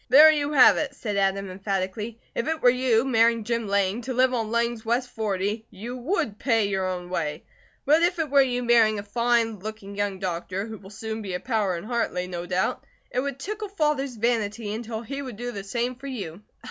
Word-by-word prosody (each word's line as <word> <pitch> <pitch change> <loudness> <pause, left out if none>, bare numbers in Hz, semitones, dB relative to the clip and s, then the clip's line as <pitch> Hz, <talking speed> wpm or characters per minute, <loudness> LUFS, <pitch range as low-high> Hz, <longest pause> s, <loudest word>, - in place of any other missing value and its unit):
"There 300 +5 +9
you 295 -1 -1
have 265 -3 +7
it!" 285 -2 -2
said 210 -6 -3
Adam 195 0 +1
emphatically. 195 +4 -3
"If 235 - -2
it 320 0 0
were 245 - +8
you, 250 -2 +2
marrying 230 -2 +3
Jim 230 0 -1
Lang, 200 +2 +1
to 255 +1 -4
live 255 +1 +4
on 225 -3 -1
Lang's 235 0 0
west 245 +2 0
forty, 210 0 -2
you 235 +6 -7
WOULD 255 - -2
pay 225 -5 +2
your 190 -1 -1
own 180 -1 -4
way. 150 -4 -2 0.4
But 305 +4 +5
if 350 +1 +2
it 315 -4 -2
were 280 -1 +7
you 250 -2 0
marrying 230 -3 +4
a 200 - -4
fine 230 0 +1
looking 205 0 -7
young 205 -1 -1
doctor, 185 +1 -3
who 220 -1 -8
will 195 - -13
soon 220 +2 -5
be 190 -3 -4
a - - -2
power 210 -7 0
in 170 - -7
Hartley, 225 -6 -1
no 175 -1 -5
doubt, 185 +1 0 0.3
it 250 - 0
would 275 0 -2
tickle 420 +8 -5
Father's 300 -8 0
vanity 220 -2 -1
until 225 0 -5
he 275 +4 -5
would 255 -6 -7
do 245 +1 -4
the 200 -4 -6
same 235 +5 -2
for 265 +3 -10
you." 200 -9 -6
225 Hz, 215 wpm, -25 LUFS, 200-255 Hz, 0.4 s, There